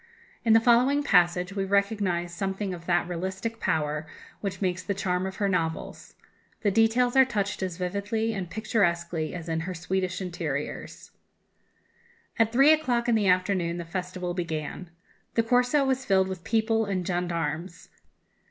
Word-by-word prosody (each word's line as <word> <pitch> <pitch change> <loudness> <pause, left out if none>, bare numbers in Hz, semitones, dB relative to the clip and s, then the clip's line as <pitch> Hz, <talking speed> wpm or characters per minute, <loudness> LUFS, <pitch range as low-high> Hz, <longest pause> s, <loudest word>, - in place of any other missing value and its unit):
In 225 -2 +4
the 225 - +8
following 250 +5 +4
passage 180 -4 +3
we 195 -1 -1
recognize 195 -3 0
something 195 +2 -3
of 170 -1 -9
that 175 -1 +2
realistic 190 +6 -4
power 155 -3 -1 0.3
which 195 -2 -4
makes 185 -2 -1
the 200 +1 -3
charm 185 -1 -1
of 190 - -6
her 200 -1 0
novels. 165 -4 -3 0.5
The 205 - +3
details 225 +4 +3
are 265 - +8
touched 205 -6 -2
as 185 -3 -3
vividly 200 +5 -1
and 190 -4 -4
picturesquely 170 -6 0
as 170 -2 -7
in 160 -1 -1
her 180 +3 -4
Swedish 180 +2 -2
interiors: 165 -6 -5 1.3
"At 225 0 +4
three 270 +5 +6
o'clock 250 -7 0
in 240 - +3
the 215 -3 +2
afternoon 180 -2 +1
the 170 - -5
festival 180 0 -4
began. 165 0 -4 0.5
The 230 - +3
Corso 250 +4 +3
was 265 0 0
filled 190 -3 +2
with 185 -2 -6
people 225 +1 +1
and 190 -3 -2
gendarmes. 170 -1 -3
190 Hz, 155 wpm, -27 LUFS, 175-220 Hz, 1.3 s, the